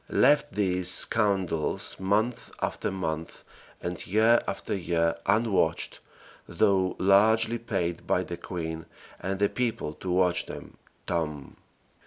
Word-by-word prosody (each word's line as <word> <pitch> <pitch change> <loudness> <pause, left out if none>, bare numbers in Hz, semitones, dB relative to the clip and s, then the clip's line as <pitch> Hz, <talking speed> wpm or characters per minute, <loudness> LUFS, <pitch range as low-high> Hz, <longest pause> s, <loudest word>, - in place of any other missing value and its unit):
left 145 +2 +3
these 90 -3 +1
scoundrels 95 -5 +1
month 105 +5 0
after - - -2
month 80 -4 -4 0.4
and 90 -1 -4
year 110 +4 +4
after 100 - -3
year 85 -2 0
unwatched, 105 -7 +1 0.5
though 95 +1 +2
largely 110 +4 +4
paid 90 -7 -3
by - - +2
the 85 - -6
queen 80 -2 -5 0.4
and 95 +1 -3
the 100 +1 +3
people 115 -10 -2
to 90 - -7
watch 90 0 +2
them - - -9 0.3
("TOMB!"). 75 -5 -3
95 Hz, 120 wpm, -27 LUFS, 85-105 Hz, 0.5 s, year